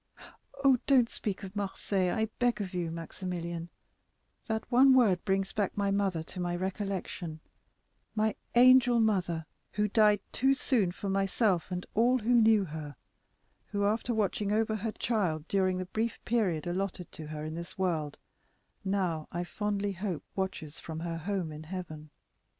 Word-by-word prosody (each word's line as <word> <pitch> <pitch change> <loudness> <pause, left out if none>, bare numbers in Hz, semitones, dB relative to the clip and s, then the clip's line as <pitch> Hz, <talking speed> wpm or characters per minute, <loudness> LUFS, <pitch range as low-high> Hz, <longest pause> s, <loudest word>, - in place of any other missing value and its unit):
"Don't 255 -4 +5
speak 200 -2 -4
of 195 +1 -8
Marseilles, 195 -2 -1
I 220 - +2
beg 245 -3 +2
of 195 -2 -4
you, 175 -2 -1
Maximilian; 170 0 -5 0.8
that 220 -1 -1
one 260 +2 +7
word 205 -9 +4
brings 195 0 0
back 205 -2 -1
my 200 -1 +1
mother 195 -5 0
to 180 - -8
my 175 -1 -1
recollection—my 190 +2 -4 0.2
angel 250 -1 +7
mother, 180 -7 +1 0.3
who 210 0 +1
died 210 -1 +4
too 270 +2 +3
soon 225 -9 +1
for 200 - -6
myself 195 -1 +1
and 180 -1 -4
all 240 +4 +4
who 240 +1 +1
knew 220 -3 +5
her; 150 -3 -7 0.8
but - - -3
who, 200 - +2
after 225 +3 0
watching 210 -2 0
over 220 0 +1
her 215 +2 -2
child 180 -10 -1
during 185 -2 +1
the 185 - -3
brief 220 +5 -2
period 195 -10 +1
allotted 180 0 -3
to 155 - -8
her 150 0 -5
in 155 - -4
this 170 +2 -7
world, 160 -6 -1 0.7
now, 185 -5 -1
I 175 +1 -2
fondly 205 +2 -2
hope, 190 -3 -4
watches 185 -6 -4
from 160 -1 -6
her 165 -1 -3
home 180 -1 -2
in 150 0 -8
heaven. 155 -3 -7
195 Hz, 155 wpm, -30 LUFS, 175-215 Hz, 0.8 s, one